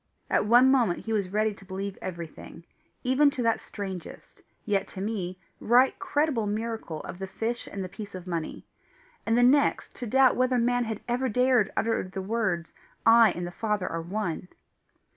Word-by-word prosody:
At - - +2
one 245 +4 +6
moment 235 -10 +2
he 225 - -2
was 200 -4 0
ready 215 +2 +1
to 200 - -16
believe 195 +1 -5
everything, 170 -1 -8 0.4
even 260 +3 +4
to 275 -3 -3
that 230 -1 +2
strangest, 190 -4 -8 0.2
yet 200 -2 0
to 190 - -9
me 190 -3 -3 0.2
right 250 +3 +4
credible 300 - 0
miracle 215 -6 -3
of 180 - -8
the 190 - -4
fish 230 +4 -3
and 195 - -5
the - - -4
piece 200 +1 -9
of 185 -1 -8
money, 170 -3 -4 0.6
and 225 +1 +3
the 245 - +5
next 280 +3 +3
to 245 - -5
doubt 260 +2 +5
whether 255 0 +2
man 245 0 +2
had 220 -2 -4
ever 250 +2 0
dared 250 -2 +3
utter 225 0 +1
the 185 +1 -6
words, 190 -4 -2 0.3
"I 230 -1 +7
and 175 - -4
the 175 - -6
Father 210 0 -2
are 165 - -3
one." 180 -1 -3
215 Hz, 180 wpm, -27 LUFS, 190-245 Hz, 0.6 s, I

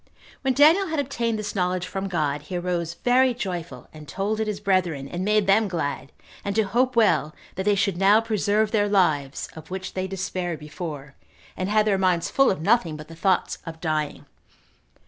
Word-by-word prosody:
When 265 -2 0
Daniel 325 +7 +5
had 320 -1 -3
obtained 235 -5 -1
this 210 -1 -4
knowledge 180 -2 0
from 195 +1 -4
God, 150 -5 -1
he 175 +5 -5
arose 175 -1 -2
very 250 0 +3
joyful, 180 -7 -5
and 155 -1 -12
told 205 +6 -2
it 220 - -1
his 210 -2 -3
brethren, 180 -8 0
and 175 +5 -4
made 210 0 +2
them 205 +3 +4
glad, 145 -6 -3 0.3
and 200 0 -3
to 220 - +3
hope 245 +6 +1
well 200 -9 +3 0.2
that 190 - -4
they 205 -1 +3
should 195 -2 0
now 200 +3 +5
preserve 215 -1 0
their 205 -2 +2
lives, 155 -9 +1
of 160 - -11
which 190 0 -5
they 185 0 -2
despaired 185 -3 -3
before, 150 -2 -7 0.4
and 185 +1 -3
had 210 0 +3
their 200 -3 +2
minds 180 -3 +1
full 275 0 +4
of 185 -4 -2
nothing 170 -8 +2
but 155 +1 -11
the 165 - -10
thoughts 185 +2 0
of 165 -1 -8
dying. 155 -3 -2
190 Hz, 195 wpm, -24 LUFS, 165-215 Hz, 0.4 s, Daniel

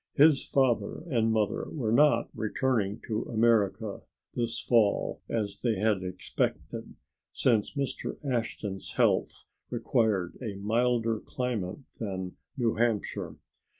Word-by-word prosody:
His 150 -1 +6
father 125 -1 +1
and 115 -8 +1
mother 110 -2 0
were 120 -8 -2
not 120 -2 +4
returning 110 -2 0
to 110 -1 -1
America 110 -4 +1 0.3
this 120 -1 -1
fall 110 -4 +2
as 105 -3 -2
they 115 -3 +1
had 105 -1 +1
expected, 90 0 -3 0.4
since 115 +1 +2
Mr. 140 -2 -3
Ashton's 115 -6 -2
health - - +1 0.2
required 110 -6 0
a 110 -5 -4
milder 115 +2 +1
climate 120 -4 -3 0.2
than 95 -4 -4 0.2
New 115 -4 +1
Hampshire. 115 -3 0
115 Hz, 115 wpm, -29 LUFS, 105-125 Hz, 0.4 s, His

